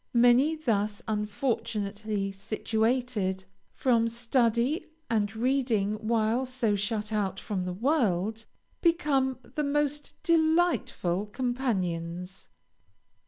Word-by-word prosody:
Many 245 +6 +5
thus 215 -8 -1
unfortunately 210 -2 -2
situated, 220 -1 -1 0.3
from 230 -3 +2
study 235 +4 +1 0.2
and 210 -2 +1
reading 220 -4 0
while 225 +2 +2
so 245 -5 0
shut 210 +1 -2
out 195 -3 -1
from 190 -4 -3
the 180 - -3
world, 220 - 0 0.4
become 290 -7 +2
the 300 - -4
most 295 0 -1
delightful 320 - +2
companions. 190 - -3
225 Hz, 90 wpm, -28 LUFS, 205-260 Hz, 0.4 s, Many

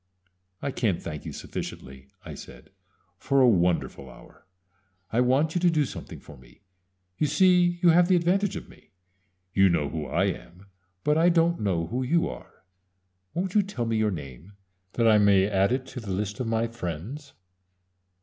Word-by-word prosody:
"I 140 - -1
can't 105 -9 0
thank 75 -3 -7
you - - -5
sufficiently," 65 0 -8 0.2
I - - -7
said, - - -12 0.5
"for 140 0 +1
a 130 - +6
wonderful 90 - +1
hour. - - -17 0.7
I 120 - +3
want 135 +6 +2
you 175 - -1
to 180 - +4
do 155 -3 +2
something - - -9
for 75 - -14
me. 65 +5 -20 0.6
You 150 - +2
see 175 +3 +3
you 175 - +7
have 170 +1 +5
the 185 - +4
advantage 185 +3 +1
of - - -7
me. - - -19 0.6
You 95 0 +5
know 80 -5 0
who 80 -1 -5
I - - 0
am; 90 +3 -5 0.4
but 150 +1 +2
I 170 +2 +5
don't 170 0 +2
know 90 -5 0
who 120 +9 -3
you 165 +6 +1
are. - - -11 0.7
Won't 180 +1 -2
you 210 - +5
tell 190 -12 -4
me 115 0 -1
your 110 -1 +2
name, 75 +1 -8 0.4
that 115 -1 +2
I 110 -1 +6
may 100 -2 +4
add 100 +1 +1
it 130 +1 -1
to 130 - -7
the 110 -4 -9
list 100 +2 -3
of 125 - -2
my 115 0 0
friends?" 115 - -6
115 Hz, 185 wpm, -26 LUFS, -, 0.7 s, you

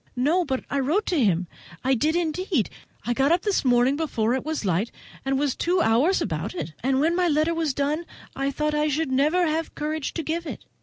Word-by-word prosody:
"No, 305 +9 +2
but 265 -5 -3
I 280 - -1
wrote 315 +11 +1
to 320 -8 +1
him—I 180 +4 -1
did 305 +6 +1
indeed, 345 - 0 0.3
I 240 - +1
got 275 +4 +2
up 345 +1 +3
this 410 -2 +1
morning 250 +1 +3
before 240 -8 0
it 260 - -1
was 310 -7 -3
light, 190 +5 +1 0.3
and 270 0 0
was 280 -2 0
two 360 +2 +1
hours 290 +7 +3
about - - -3
it; 170 - -5
and 265 +1 +1
when 325 +4 +2
my 360 0 +2
letter 310 +1 +2
was 320 -5 -1
done 300 +4 -1 0.3
I 275 0 0
thought 300 +2 -1
I 300 0 +1
never 300 +3 +1
should - - +1
have 320 +1 -3
courage 305 -1 -3
to 330 - -2
give 330 +2 -3
it. - - -7
300 Hz, 215 wpm, -25 LUFS, 260-330 Hz, 0.3 s, up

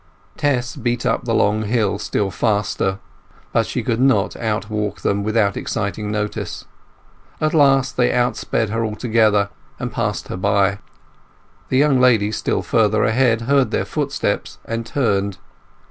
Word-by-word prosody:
Tess 130 -4 0
beat 120 0 -2
up 120 0 0
the 115 - 0
long 105 +1 +2
hill 105 -2 0
still 105 -1 -1
faster; 100 -1 0 0.6
but - - +2
she - - -3
could 115 - -1
not 135 0 +2
outwalk 105 -2 -2
them 100 0 0
without 110 -1 +1
exciting 105 -1 -3
notice. 105 0 -3 0.7
At 155 0 0
last 135 -3 +3
they 125 -1 +3
outsped 120 -3 0
her 115 +2 -1
altogether, 110 -2 +2 0.3
and - - -4
passed - - -2
her - - -4
by. 100 +1 +1 0.9
The 130 - +1
young 140 -2 +4
lady 110 -5 +4
still - - -1
further 110 -1 +2
ahead 115 -1 +2
heard 135 +2 +2
their - - -1
footsteps - - -2
and 115 0 -4
turned. 100 -7 0
110 Hz, 145 wpm, -20 LUFS, 105-125 Hz, 0.9 s, young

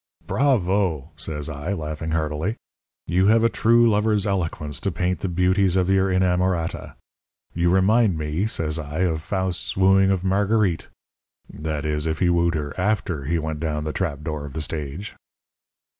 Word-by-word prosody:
"'Bravo!' 95 - +1
says 75 -1 -4
I, 80 +5 -4
laughing 80 -2 -4
heartily. 80 +5 -1 0.5
'You 90 +3 +2
have 115 +1 +4
a 115 - +4
true 115 +1 +4
lover's 105 -1 +2
eloquence 80 -7 -2
to 100 - -2
paint 90 0 -1
the 95 - -2
beauties 90 +1 +2
of 95 0 +2
your 95 0 +3
inamorata. 90 -2 0 0.6
You 85 +1 +1
remind 95 +1 +3
me,' 80 +6 -1
says 80 -8 -2
I, 75 +2 -4
'of 80 -4 0
Faust's 95 +2 -3
wooing 95 0 +5
of 95 -2 0
Marguerite 100 -2 +1 0.7
that 75 -1 -4
is, 75 0 -1
if 80 -1 -1
he 90 0 +2
wooed 85 -1 +2
her 75 -1 -3
after 90 -7 -1
he 85 +4 0
went 80 -1 -3
down 75 -1 -2
the 75 0 -3
trap 75 -6 -2
door 75 -2 -4
of 70 -2 -8
the 80 - -3
stage.' 75 +6 -5
90 Hz, 165 wpm, -23 LUFS, 80-95 Hz, 0.7 s, wooing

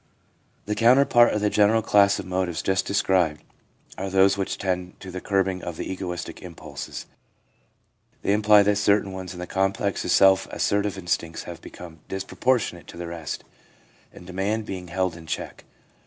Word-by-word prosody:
The 105 - -1
counterpart 120 +1 +5
of 105 - -1
the 105 -1 +1
general 105 +2 +3
class 100 -2 +4
of - - -6
motives 90 -2 -2
just 95 0 0
described 90 -6 +1 0.6
are 95 +1 -3
those 95 +1 +4
which 100 -1 -3
tend 90 -1 -3
to 95 - -9
the 90 0 -6
curbing 95 -2 0
of 85 -2 -5
the - - -4
egoistic 90 -2 -5
impulses. - - -8 1.2
They 100 - +2
imply 105 0 +6
that 105 0 +2
certain 100 -1 +2
ones 95 -1 -7
in - - -9
the 90 - -4
complex 95 +1 -1
of - - -4
self 95 -1 +5
assertive 100 -1 0
instincts 85 -2 -2
have 85 -1 -9
become 85 -2 -11
disproportionate 95 - -1
to - - -11
the 85 - -5
rest, 85 -3 -6 0.7
and 90 - -14
demand 100 +4 -2
being 95 -3 -6
held 90 0 -1
in 80 -1 -12
check. - - -5
95 Hz, 170 wpm, -24 LUFS, 90-100 Hz, 1.2 s, imply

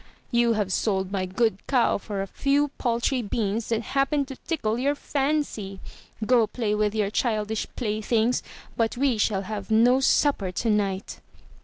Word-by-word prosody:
You 235 -1 +3
have 205 -3 -1
sold 190 -2 0
my 190 -2 -1
good 200 +1 +1
cow 250 -6 +2
for 200 -1 -4
a - - -3
few 280 +8 +1
paltry 240 +1 0
beans 215 0 -2
that 230 0 0
happened 275 +2 0
to 265 - -6
tickle 240 -8 -2
your 285 +3 +1
fancy. 275 -10 -2 0.5
Go 235 -2 +4
play 220 -3 -2
with 210 0 0
your 205 -2 0
childish 215 -2 -1
playthings, 220 +1 0 0.3
but 230 0 0
we 260 -4 +1
shall 200 -2 +1
have 200 -1 -6
no 235 +4 +5
supper 270 -7 +2
tonight." 205 -1 -1
225 Hz, 155 wpm, -25 LUFS, 205-255 Hz, 0.5 s, no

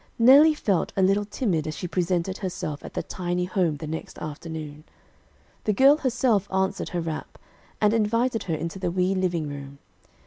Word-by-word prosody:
Nellie 280 +7 +7
felt 200 - 0
a 190 - +3
little 200 +2 +3
timid 190 - -1
as 155 - -4
she 180 - -4
presented 180 +1 -1
herself 175 -6 -4
at - - -10
the - - -1
tiny 180 -1 -2
home 180 -5 0
the 155 - -7
next 160 +1 -6
afternoon. 155 -1 -7 0.8
The 215 - +2
girl 275 +7 +6
herself 245 -7 +1
answered 190 +1 -1
her 175 -2 -2
rap, 160 -1 -5 0.4
and 210 0 +3
invited 230 +2 +1
her 165 - -1
into 165 +4 -5
the 180 -2 -1
wee 180 +2 +1
living 175 -4 -1
room. 140 -1 -8
185 Hz, 175 wpm, -25 LUFS, 160-210 Hz, 0.8 s, Nellie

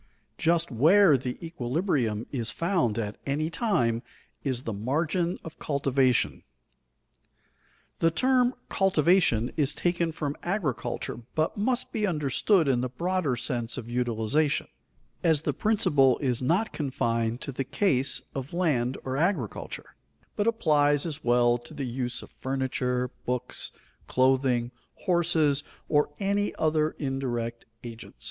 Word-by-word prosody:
Just 170 -1 +2
where 160 - +6
the 125 -1 -3
equilibrium 125 - -1
is 120 -5 -2
found 165 - 0
at 105 -2 -3
any 155 +4 -1
time 120 - +1 0.4
is 130 -3 -1
the 115 - -3
margin 160 - 0
of 160 - -10
cultivation. 135 -3 +1 1.6
The 165 - +4
term 255 +6 +2
"cultivation" 170 - +3
is 150 -1 +3
taken 175 -1 0
from 150 -2 -3
agriculture 175 - -2 0.2
but 155 0 +1
must 245 +4 0
be 215 -2 0
understood 155 - +2
in 125 -3 +2
the 130 - -2
broader 170 0 -1
sense 120 0 -2
of 120 -2 -6
utilization, 125 +5 0 0.6
as 160 -3 +3
the - - 0
principle 145 - +3
is 125 -4 0
not 175 - +1
confined 115 -5 -1
to 140 - -4
the 135 +1 -2
case 135 -3 +1
of 135 +2 -5
land 135 -8 +1
or 130 0 -3
agriculture, 160 - -2 0.4
but 210 - 0
applies 145 -9 +3
as 155 -2 -5
well 120 0 +3
to 120 +6 -13
the 140 -2 -3
use 125 0 -2
of - - -14
furniture, 130 -1 -1 0.2
books, 125 0 -2 0.4
clothing, 130 -2 +2 0.3
horses, 160 -6 +3 0.2
or 150 0 +2
any 200 +1 0
other 155 0 +1
indirect 120 -4 -3 0.2
agents. 115 -1 -9
140 Hz, 130 wpm, -27 LUFS, 125-170 Hz, 1.6 s, where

